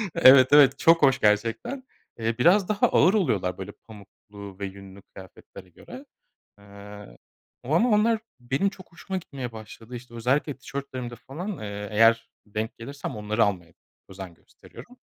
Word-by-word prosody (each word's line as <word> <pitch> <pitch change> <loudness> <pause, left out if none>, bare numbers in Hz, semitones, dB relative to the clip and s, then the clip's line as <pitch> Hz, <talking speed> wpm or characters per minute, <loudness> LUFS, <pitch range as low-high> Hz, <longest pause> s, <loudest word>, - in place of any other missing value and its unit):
Evet, 130 -5 +7
evet, 145 -2 +6
çok 165 0 +4
hoş 135 -2 +4
gerçekten. 115 - 0 0.4
Eee, 115 +1 -2
biraz 185 +7 +4
daha 210 -1 +2
ağır 180 +4 +3
oluyorlar, 100 - 0
böyle, 95 - -7
pamuklu 100 -2 -14
ve 100 - -3
yünlü 95 0 -11
kıyafetlere 95 0 -15
göre. 255 - -13 0.5
Eee, 100 -7 -13 0.5
o 140 +6 -2
ama 230 +9 +3
onlar 220 +1 +2 0.2
benim 130 +10 -1
çok 190 -3 -16
hoşuma 190 +3 -6
gitmeye 135 -8 -8
başladı. 110 +2 -11
İşte, 120 0 -12
özellikle 135 +5 -1
tişörtlerimde 130 -3 -7
falan, 170 - -7
eee, 105 -1 -6
eğer 115 +2 +3 0.2
denk 110 +2 -5
gelirsem 140 +1 -7
onları 105 +2 0
almaya 90 -5 -3 0.4
özen 95 -2 -10
gösteriyorum. 245 - -16
115 Hz, 145 wpm, -25 LUFS, 100-150 Hz, 0.5 s, Evet